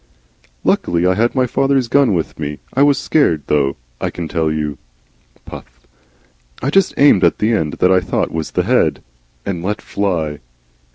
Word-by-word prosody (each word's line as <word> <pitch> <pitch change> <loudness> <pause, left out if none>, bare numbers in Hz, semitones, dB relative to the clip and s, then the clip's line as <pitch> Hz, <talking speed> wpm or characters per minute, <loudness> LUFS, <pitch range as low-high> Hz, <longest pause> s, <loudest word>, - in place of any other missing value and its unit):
"Luckily 85 +1 +1
I 90 - +3
had 115 +7 0
my 130 -1 +2
father's 135 0 +1
gun 130 -4 +3
with 80 -2 -3
me. 75 -1 -4 0.2
I 135 - +1
was 145 -1 +4
scared, 85 - +1
though, 70 -2 +1 0.3
I - - -1
can 85 -2 -6
tell 80 -2 -1
you. 75 -2 -3 0.7
(Puff.) - - -12 0.7
I 135 - -2
just 195 +3 +2
aimed 135 -10 +5
at 85 - +3
the 110 +2 +1
end 80 -9 -1
that 90 - +2
I 95 - +5
thought 90 0 -2
was 80 -1 -3
the - - -1
head. - - +1 0.4
And 90 -4 -3
let 105 +3 -2
fly. 85 -7 -2
90 Hz, 175 wpm, -17 LUFS, 80-125 Hz, 0.7 s, aimed